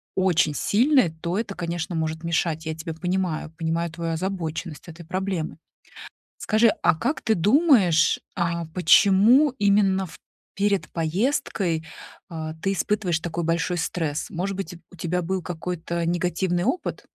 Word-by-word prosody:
очень 175 -5 +2
сильный, 250 - +3
то 170 +4 -4
это, 210 -3 -4
конечно, 170 0 -3
может 160 0 -2
мешать. 165 -1 -1
Я 160 - -2
тебя 160 0 -6
понимаю, 180 -2 -2
понимаю 165 0 -1
твою 165 0 -3
озабоченность 170 -2 -4
этой 170 +1 -10
проблемы. 185 -3 -3 0.8
Скажи, 225 +1 +3
а - - +4
как 255 - -1
ты 220 -2 +2
думаешь, 200 - +4 0.2
а 170 -1 -1
почему 200 - +5
именно 200 -2 +3
в 155 - -12 0.4
перед 200 -1 0
поездкой, 170 - -1 0.4
а, 160 -3 -5
ты 195 - +1
испытываешь 195 -3 0
такой 170 0 -3
большой 165 +2 0
стресс? 160 -2 -2
Может 185 +3 -3
быть, 180 -3 -5 0.2
у 180 - -13
тебя 175 +2 -1
был 185 +2 -2
какой-то 170 0 -4
негативный 175 +1 0
опыт? 355 - -2
175 Hz, 140 wpm, -24 LUFS, 165-195 Hz, 0.8 s, почему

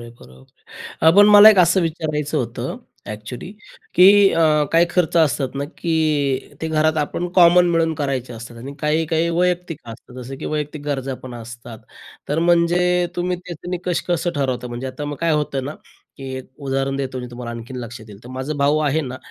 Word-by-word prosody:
आहे, 120 0 -10
बरोबर 65 0 -15 0.2
आहे. 160 - -2
अ, - - +9
पण 205 0 +8
मला 210 +1 +10
एक 210 - +2
असं 180 +1 +4
विचारायचं 155 -2 -2
होतं, 120 -3 -4 0.3
ॲक्चुअली 110 - -7 0.4
की 180 +1 +7 0.3
अ, 165 - +1 0.3
काही 165 +1 +5
खर्च 175 -2 0
असतात 140 -5 +1
ना, 140 +1 -2
की 155 -5 0
ते 160 - -3
घरात 155 0 +1
आपण 155 +4 -2
कॉमन 175 0 +6
मिळून 165 -1 +1
करायचे 135 -4 -3
असतात 115 +1 -10
आणि 135 +4 -8
काही-काही 160 +2 0
वैयक्तिक 175 -2 -1
असतात. 115 +2 -12
जसं 135 +2 -8
की - - -8
वैयक्तिक 150 -1 -4
गरजा 135 -2 -3
पण 130 -2 -8
असतात. 120 0 -10 0.5
तर 145 - 0
म्हणजे 175 +1 +2
तुम्ही 180 +1 -1
त्याचं 175 -1 -9
निकष 180 -1 -2
कसं 175 0 0
ठरवता 130 -3 -2
म्हणजे? 120 +2 -6
आता 130 +3 -6
मग 145 0 -5
काय 165 -1 +1
होतं 145 -3 -1
ना, 145 +3 -5 0.4
की 135 - -10
एक 130 - -11
उदाहरण 135 0 -2
देतो 130 -2 -4
मी 125 - -6
तुम्हाला 120 -1 -7
आणखीन 115 +2 -8
लक्षात 115 -1 -8
येईल. 100 -2 -12
तर - - -11
माझा 130 +4 -4
भाऊ 145 +2 +2
आहे 155 0 +1
ना 130 -4 -6
150 Hz, 195 wpm, -20 LUFS, 130-170 Hz, 0.5 s, मला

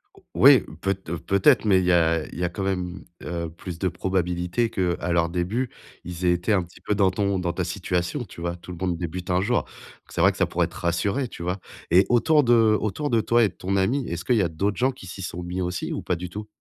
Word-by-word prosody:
O - - -19
oui, - - +7 0.2
peut 95 0 +1
peut-être, 95 +3 +2
mais 95 -3 +5
il 90 - -1
y 90 - +3
a 80 -2 +3
il - - -9
y 90 - -1
a 90 - +1
quand 95 +3 -5
même, 90 -1 -3 0.2
heu, 85 -2 -4
plus 90 -1 -7
de 95 +2 0
probabilités 90 +4 -1
qu'à 90 -1 -1
leur 85 -1 +2
début, 95 +9 -1 0.3
ils 90 +1 -5
étaient 90 +4 +2
un 95 -3 +2
petit 85 0 -16
peu 105 - -1
dans 100 -2 +3
ton 100 0 0
dans 90 -1 -1
ta - - -2
situation 90 +10 -2
tu 85 - -12
vois? 85 0 -2
Tout 90 +1 -11
le 90 - -7
monde 90 -2 -1
débute 90 +1 -5
un 90 +1 +2
jour. 120 +4 +1 0.4
C'est - - -2
vrai - - +6
que - - -12
ça - - +2
pourrait - - 0
te - - -15
rassurer, 100 +10 -1
tu 85 - -9
vois? 90 +2 -1 0.3
Et 95 +2 +6
autour 150 +5 +4
de 120 0 +4 0.3
autour 110 +8 -2
de 115 -1 +3
toi 120 +2 +3
et 105 - +3
de - - -18
ton 95 +2 -3
ami, 120 +8 +1
est-ce 85 0 -4
qu'il 125 - +3
y 105 - +4
a 90 - +2
d'autres 95 +5 -1
gens 130 +2 +2
qui 125 - -13
s'y 95 +2 -8
sont 90 -1 -5
mis 90 +1 -3
aussi, 90 -1 -3
ou - - -3
pas 90 - -1
du 90 +1 -6
tout? 105 +3 -7
90 Hz, 260 wpm, -24 LUFS, 85-100 Hz, 0.4 s, oui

